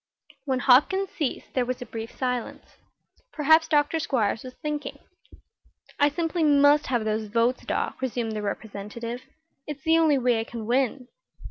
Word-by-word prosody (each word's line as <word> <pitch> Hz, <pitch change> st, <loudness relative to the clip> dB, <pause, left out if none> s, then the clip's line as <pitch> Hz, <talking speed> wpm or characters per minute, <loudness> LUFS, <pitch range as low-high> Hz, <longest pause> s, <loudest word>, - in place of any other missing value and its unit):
When 265 Hz, -2 st, 0 dB
Hopkins 355 Hz, +11 st, +4 dB
ceased 295 Hz, -6 st, -4 dB
there 255 Hz, -, +1 dB
was 250 Hz, 0 st, -3 dB
a 245 Hz, -, -6 dB
brief 225 Hz, 0 st, -7 dB
silence. 250 Hz, -2 st, -4 dB, 0.5 s
Perhaps 315 Hz, +2 st, +4 dB
Dr. 300 Hz, 0 st, +2 dB
Squiers 225 Hz, -8 st, 0 dB
was 255 Hz, 0 st, -9 dB
thinking. 295 Hz, -2 st, -4 dB, 1.0 s
"I 290 Hz, -, +5 dB
simply 330 Hz, +2 st, -1 dB
must 290 Hz, 0 st, +5 dB
have 240 Hz, -4 st, 0 dB
those 215 Hz, 0 st, -1 dB
votes, 230 Hz, +4 st, +1 dB
Doc," -, -, -2 dB
resumed 240 Hz, -3 st, -2 dB
the 215 Hz, -1 st, -3 dB
Representative. 215 Hz, +4 st, -5 dB, 0.5 s
"It's 295 Hz, -2 st, -7 dB
the 325 Hz, +1 st, +4 dB
only 310 Hz, -3 st, +4 dB
way 245 Hz, -3 st, +2 dB
I -, -, -1 dB
can 230 Hz, -1 st, -7 dB
win." 250 Hz, +1 st, 0 dB
255 Hz, 155 wpm, -25 LUFS, 230-295 Hz, 1.0 s, I